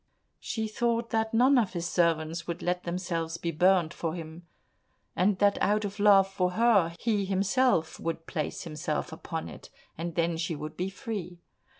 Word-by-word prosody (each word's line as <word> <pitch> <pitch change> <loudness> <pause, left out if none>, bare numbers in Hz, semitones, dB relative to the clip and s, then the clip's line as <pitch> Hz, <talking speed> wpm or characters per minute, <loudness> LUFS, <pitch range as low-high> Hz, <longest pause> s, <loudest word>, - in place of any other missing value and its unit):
She 220 -1 -3
thought 230 +1 -1
that 220 0 0
none 255 +4 +5
of 215 -5 -1
his 170 -1 -2
servants 165 -1 0
would 170 -1 -4
let 180 0 -1
themselves 170 -2 -3
be 170 0 -2
burnt 175 0 +3
for 165 -1 -3
him, 165 0 -9 0.7
and 190 +2 +2
that 200 0 +2
out 210 +1 +2
of 205 +1 -6
love 200 -2 +6
for 185 -2 -1
her, 200 -7 +3
he 215 -4 +1
himself 195 -1 +1
would 165 0 -4
place 155 -4 -4
himself 155 0 -3
upon 160 0 -5
it, - - -11 0.3
and 170 0 -4
then 170 -1 +1
she 165 0 -2
would 155 +1 -7
be 180 +3 -2
free. 195 -4 -6
180 Hz, 175 wpm, -28 LUFS, 165-205 Hz, 0.7 s, love